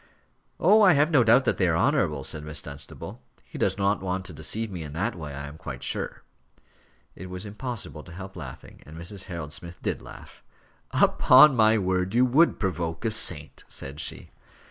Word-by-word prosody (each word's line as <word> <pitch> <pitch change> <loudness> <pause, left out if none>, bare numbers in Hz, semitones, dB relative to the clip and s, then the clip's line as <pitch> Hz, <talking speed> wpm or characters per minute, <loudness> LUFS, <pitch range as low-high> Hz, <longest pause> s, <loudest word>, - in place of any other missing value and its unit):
"Oh! 210 +6 +5
I 190 -4 +7
have 150 +3 +3
no 140 -6 +5
doubt 120 +4 +5
that - - 0
they 90 - +3
are 80 -1 +1
honourable," 90 - +1
said 75 +3 -5
Miss 75 -1 -4
Dunstable. 70 -1 -8 0.2
"He - - -10
does - - +1
not 100 0 +1
want 95 0 -3
to 95 - -7
deceive 105 +8 -2
me 90 -3 -6
in 75 -2 -7
that 85 +6 -1
way, 75 -4 -7
I 70 +1 -6
am 75 +2 -11
quite 65 -3 -7
sure." - - -1 0.9
It 90 +1 -9
was 90 +2 -6
impossible 105 -6 -6
to 90 - -13
help 95 +2 -9
laughing, 75 -8 -10
and 80 +1 -11
Mrs. 90 +3 -7
Harold 80 -4 -6
Smith 85 +2 -8
did - - -2
laugh. - - -13 0.5
"Upon 135 +2 +6
my 110 -1 +4
word, 95 0 -1
you 125 +1 +5
would 145 +7 +3
provoke 85 -2 -3
a 110 - +1
saint," 80 -9 +1
said 70 +2 -7
she. 80 - -3
90 Hz, 195 wpm, -26 LUFS, 80-115 Hz, 0.9 s, I